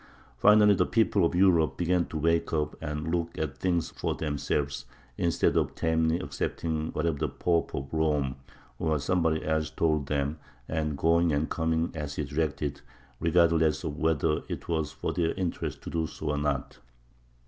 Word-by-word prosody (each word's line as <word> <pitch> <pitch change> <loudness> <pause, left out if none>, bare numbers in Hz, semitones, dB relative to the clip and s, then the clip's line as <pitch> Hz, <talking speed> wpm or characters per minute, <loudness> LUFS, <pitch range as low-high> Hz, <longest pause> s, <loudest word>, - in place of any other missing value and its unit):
Finally 105 +3 +7
the 95 - +2
people 110 -4 +2
of 85 - +2
Europe 90 -4 +4
began 90 0 +1
to 80 - -5
wake 85 +2 +1
up 75 -1 0
and 75 +1 -3
look 85 -1 -2
at 70 -4 -3
things 85 -3 0
for - - -2
themselves, 70 -1 -2 0.3
instead 85 +4 +1
of - - +1
tamely 80 0 +1
accepting 80 -3 -3
whatever 75 -2 -1
the - - 0
Pope 85 -2 0
of 70 0 -4
Rome 75 -4 +1 0.4
or 80 -2 +1
somebody 80 +1 0
else 80 0 0
told 75 -3 0
them, 75 +1 -1 0.3
and 75 -2 -2
going 85 +2 +3
and 75 +2 0
coming 80 0 0
as 75 -3 -5
he - - -1
directed, 70 -1 -2 0.4
regardless 85 -2 +3
of 70 - -3
whether 80 -1 +1
it - - -5
was 80 -3 -1
for - - -3
their 85 -2 0
interest 90 -3 -3
to - - -6
do 80 -1 -1
so 75 +1 -4
or 75 - -1
not. 75 -3 -2
80 Hz, 170 wpm, -28 LUFS, 75-85 Hz, 0.4 s, Finally